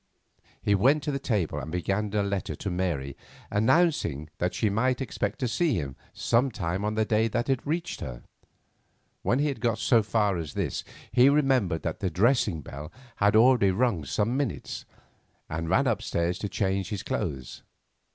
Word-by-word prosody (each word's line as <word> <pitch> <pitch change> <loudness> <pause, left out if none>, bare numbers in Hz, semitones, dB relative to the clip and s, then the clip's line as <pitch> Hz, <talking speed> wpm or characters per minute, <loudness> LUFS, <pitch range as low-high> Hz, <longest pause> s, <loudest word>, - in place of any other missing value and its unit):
He 105 - +3
went 135 +9 +3
to 150 - -1
the 140 - -2
table 105 - -1
and 80 - -6
began 95 +4 -1
a 105 - +2
letter 100 -1 -2
to 100 - -4
Mary 85 -7 -2 0.4
announcing 105 - +2
that 90 +1 -1
she 110 - +1
might 125 +5 +1
expect 110 -5 -2
to 125 - -1
see 155 +3 +1
him 70 -6 -3 0.2
sometime 110 -7 0
on 105 +1 -1
the 110 0 +2
day 110 +1 +2
that 120 +4 -2
it 130 - 0
reached 170 +3 -2
her. - - -6 1.0
When 125 - +1
he 145 +2 +2
had 140 - -5
got 115 -2 +1
so 115 -2 +4
far 105 -2 +1
as 80 -4 -6
this - - -2 0.3
he 125 +2 +6
remembered 130 - +2
that 80 - -3
the 95 - -1
dressing 105 - +2
bell 75 +2 -8 0.3
had 105 0 +3
already 115 -3 +6
rung 100 -4 +1
some 105 - 0
minutes, 135 -7 -3 0.6
and 80 +1 -3
ran - - +3
upstairs 85 +1 0
to 105 - -3
change 95 -2 -1
his 105 -4 -4
clothes. 65 -3 -4
105 Hz, 175 wpm, -27 LUFS, 90-125 Hz, 1.0 s, he